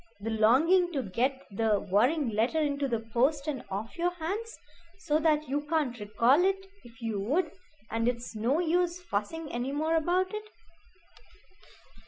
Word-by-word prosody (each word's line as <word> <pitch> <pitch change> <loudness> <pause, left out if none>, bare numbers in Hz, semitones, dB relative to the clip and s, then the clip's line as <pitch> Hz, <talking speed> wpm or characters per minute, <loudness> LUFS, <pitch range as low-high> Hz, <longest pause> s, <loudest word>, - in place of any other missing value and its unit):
the 225 +2 -4
longing 310 +12 +4
to 275 -5 -1
get 255 +7 -1
the 215 0 +1
worrying 245 - +2
letter 230 +9 +1
into 285 -2 0
the 235 -3 -1
post 275 +4 +2
and 290 -4 -3
off 210 - -5
your 350 +1 +2
hands, 400 +8 -4 0.4
so 305 -5 0
that 305 -1 +2
you 285 +2 -1
can't 290 -8 0
recall 235 +9 +3
it 385 0 +1 0.2
if 240 +1 -15
you 220 -3 -2
would, 305 - 0 0.4
and 230 +1 0
it's 240 -1 -2
no 235 +7 +1
use 350 +1 +1
fussing 325 - -4
any 245 +3 -2
more 315 +3 0
about 360 +4 +1
it." 425 0 -4
280 Hz, 160 wpm, -29 LUFS, 230-330 Hz, 0.4 s, longing